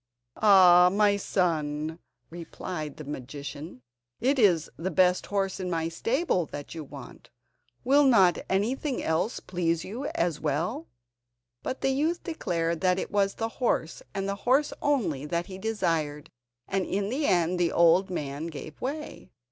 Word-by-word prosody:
"Ah! 180 Hz, -4 st, +7 dB
my 205 Hz, +1 st, +3 dB
son," 160 Hz, -5 st, -1 dB, 0.3 s
replied 165 Hz, -2 st, -6 dB
the 155 Hz, -, -7 dB
magician, 145 Hz, +1 st, -8 dB, 0.4 s
"it 265 Hz, +3 st, +1 dB
is 175 Hz, -8 st, +4 dB
the 175 Hz, +4 st, -3 dB
best 180 Hz, -1 st, +2 dB
horse 195 Hz, -2 st, -1 dB
in 185 Hz, -1 st, -3 dB
my 165 Hz, -1 st, -1 dB
stable 225 Hz, -, 0 dB
that 145 Hz, -1 st, -8 dB
you 160 Hz, -2 st, -6 dB
want! 140 Hz, -2 st, -12 dB, 0.5 s
Will 280 Hz, +3 st, +5 dB
not 195 Hz, -9 st, +5 dB
anything 245 Hz, +8 st, -1 dB
else 160 Hz, +8 st, 0 dB
please 170 Hz, -2 st, -1 dB
you 245 Hz, +9 st, -5 dB
as 170 Hz, -3 st, 0 dB
well?" 170 Hz, -, -2 dB, 0.7 s
But 260 Hz, -, -4 dB
the 270 Hz, -, +2 dB
youth 315 Hz, +6 st, 0 dB
declared 170 Hz, -, -2 dB
that 185 Hz, -1 st, +3 dB
it -, -, -4 dB
was 200 Hz, -1 st, +1 dB
the 225 Hz, 0 st, -2 dB
horse, 165 Hz, -9 st, 0 dB
and 195 Hz, 0 st, -3 dB
the 200 Hz, 0 st, -2 dB
horse 275 Hz, +4 st, +2 dB
only, 175 Hz, -, 0 dB
that 170 Hz, +2 st, -1 dB
he 190 Hz, 0 st, -9 dB
desired, 165 Hz, -9 st, -2 dB, 0.4 s
and 195 Hz, -1 st, 0 dB
in 200 Hz, +2 st, -2 dB
the 285 Hz, +3 st, 0 dB
end 175 Hz, -1 st, +2 dB
the 170 Hz, -1 st, +2 dB
old 170 Hz, +3 st, +4 dB
man 150 Hz, -2 st, -4 dB
gave 155 Hz, -1 st, -9 dB
way. 300 Hz, +4 st, -5 dB
180 Hz, 155 wpm, -27 LUFS, 160-215 Hz, 0.7 s, Ah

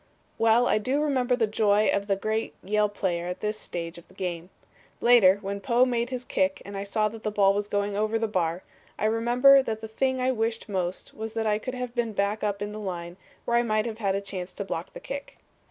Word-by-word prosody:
Well 225 Hz, +1 st, +5 dB, 0.2 s
do 255 Hz, +5 st, -2 dB
I 295 Hz, -, +2 dB
remember 255 Hz, -4 st, +2 dB
the 235 Hz, -2 st, +2 dB
joy 215 Hz, 0 st, +3 dB
of 200 Hz, 0 st, -1 dB
that 195 Hz, -1 st, 0 dB
great 220 Hz, +1 st, -1 dB
Yale 210 Hz, +2 st, +2 dB
player 175 Hz, -4 st, -2 dB
at 180 Hz, -, -5 dB
this 215 Hz, 0 st, -2 dB
stage 170 Hz, 0 st, -5 dB
of 170 Hz, -, -19 dB
the -, -, -21 dB
game. 175 Hz, -1 st, -4 dB, 0.5 s
Later, 225 Hz, -6 st, +6 dB
when 200 Hz, +1 st, -4 dB
Poe 245 Hz, +1 st, +3 dB
made 240 Hz, -1 st, -1 dB
his 250 Hz, -1 st, -5 dB
kick 190 Hz, 0 st, 0 dB
and 200 Hz, +1 st, -8 dB
I 195 Hz, -, -3 dB
saw 215 Hz, +2 st, +1 dB
that 225 Hz, +1 st, -10 dB
the 215 Hz, -, -1 dB
ball 200 Hz, -2 st, +4 dB
was 205 Hz, +1 st, -2 dB
going 205 Hz, 0 st, -1 dB
over 215 Hz, +2 st, +1 dB
the 225 Hz, 0 st, 0 dB
bar, 175 Hz, -3 st, -1 dB, 0.3 s
I -, -, -1 dB
remember 240 Hz, +5 st, +5 dB
that 225 Hz, -4 st, -3 dB
the 220 Hz, -, -7 dB
thing 260 Hz, +4 st, 0 dB
I 255 Hz, +1 st, +2 dB
wished 225 Hz, -1 st, -2 dB
most 185 Hz, -3 st, -3 dB
was 220 Hz, 0 st, -6 dB
that 225 Hz, -1 st, -1 dB
I 210 Hz, -1 st, +2 dB
could 255 Hz, +3 st, -5 dB
have 250 Hz, -1 st, -4 dB
been 230 Hz, -4 st, -2 dB
up 205 Hz, 0 st, 0 dB
in 205 Hz, -, -4 dB
the 215 Hz, -, -6 dB
line 175 Hz, -4 st, -5 dB, 0.3 s
where 235 Hz, -, +2 dB
I -, -, +5 dB
might 215 Hz, -2 st, +1 dB
have 225 Hz, -1 st, -5 dB
had 195 Hz, -3 st, +1 dB
a 200 Hz, -, -1 dB
chance 185 Hz, -2 st, -6 dB
to 200 Hz, -, -5 dB
block -, -, -5 dB
the -, -, -8 dB
kick. -, -, -7 dB
215 Hz, 240 wpm, -27 LUFS, 195-235 Hz, 0.5 s, Later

